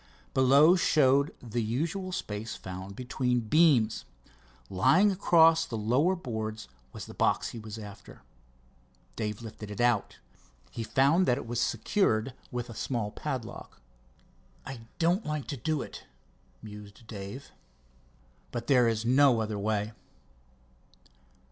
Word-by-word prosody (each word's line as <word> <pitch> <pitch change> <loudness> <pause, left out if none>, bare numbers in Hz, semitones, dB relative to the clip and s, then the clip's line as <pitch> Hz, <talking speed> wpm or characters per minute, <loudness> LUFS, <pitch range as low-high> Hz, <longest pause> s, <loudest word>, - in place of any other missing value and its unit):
Below 140 +6 +6
showed 140 -4 +3
the 120 0 -2
usual 160 - -2
space 105 - -4
found 95 +1 -8
between 125 0 -1
beams. 120 - +3 0.6
Lying 175 - +4
across 165 -4 +5
the 120 -8 -5
lower 130 - +2
boards 110 - -5 0.2
was - - -8
the - - -11
box - - +1
he 115 - -8
was 110 0 -8
after. 100 - -11 0.9
Dave 105 0 -4
lifted 110 -1 -9
it 105 - -7
out. 120 -4 +1 0.5
He - - -5
found 140 +10 +3
that 125 - +3
it - - -6
was 120 +1 -2
secured 125 - +1 0.2
with 120 0 -4
a 115 - -9
small 115 -2 -3
padlock. - - -6 0.9
"I 135 -2 -7 0.2
don't 175 +5 +2
like 150 -4 -3
to 145 - -2
do 150 +3 -1
it," - - -10 0.6
mused 105 0 -11
Dave, 105 +5 -8 1.0
"but 120 -1 -4
there 125 -3 +4
is 115 0 -1
no 130 -1 +5
other 110 -2 -2
way." 105 +1 -1
120 Hz, 130 wpm, -29 LUFS, 110-145 Hz, 1.0 s, Below